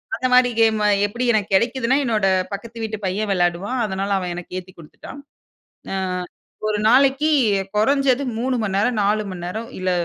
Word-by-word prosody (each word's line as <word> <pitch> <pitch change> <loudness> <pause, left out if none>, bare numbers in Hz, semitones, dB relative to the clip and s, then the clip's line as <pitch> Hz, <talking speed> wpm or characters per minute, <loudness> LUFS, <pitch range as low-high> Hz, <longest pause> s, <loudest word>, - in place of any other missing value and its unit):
அந்த 255 +2 -1
மாதிரி 250 0 +5
கேம், 220 -1 +3 0.3
எப்டி 240 +4 -3
எனக்கு 205 -2 -1
கிடைக்கிதுன்னா, 245 +4 +1
என்னோட 215 -4 0 0.3
பக்கத்து 230 +3 -7
வீட்டு 215 -1 -3
பையன் 200 +2 -2
விளையாடுவான் 180 +7 0
அதனால, 195 0 -3
அவன் 180 -1 -4
எனக்கு 175 +1 -8
ஏத்தி 185 +1 -14
குடுத்துட்டான். 170 - -12 0.7
அ, - - -2 0.7
ஒரு 210 -1 0
நாளைக்கி 275 +5 +4 0.4
குறைந்தது 275 +3 +2 0.2
3:00 255 +2 -1
மணிநேரம், 210 +3 0
4:00 210 +1 +1
மணிநேரம் 185 +6 -6
இல்ல 185 0 0
215 Hz, 150 wpm, -21 LUFS, 195-250 Hz, 0.7 s, மாதிரி